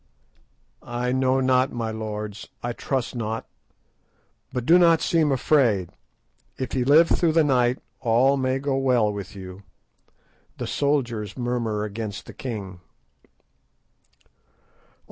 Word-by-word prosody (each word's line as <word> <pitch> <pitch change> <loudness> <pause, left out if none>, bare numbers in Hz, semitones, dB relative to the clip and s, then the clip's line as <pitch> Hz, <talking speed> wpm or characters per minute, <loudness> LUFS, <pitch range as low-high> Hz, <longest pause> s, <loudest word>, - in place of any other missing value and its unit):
"I 125 +1 -3
know 130 0 +2
not, 130 +1 +2
my 115 -2 -3
lords, 105 -1 -5 0.2
I 120 0 -2
trust 130 0 -3
not; 115 -1 -3 1.1
but 125 -2 -3
do 170 +5 +6
not 165 -2 +5
seem 160 -3 +2
afraid. 125 - +2 0.7
If 130 -3 -4
ye 130 - +1
live 150 +6 +6
through 165 -2 +2
the 165 0 +4
night 125 -3 +2 0.2
all 125 +3 +3
may 130 -1 0
go 135 0 -1
well 125 -6 +2
with 100 0 -7
you. 95 0 -9 1.0
The - - -4
soldiers 120 -8 -1
murmur 120 -4 -1
against 105 -1 -5
the - - -11
king." 100 -8 -6
125 Hz, 125 wpm, -24 LUFS, 110-135 Hz, 1.1 s, do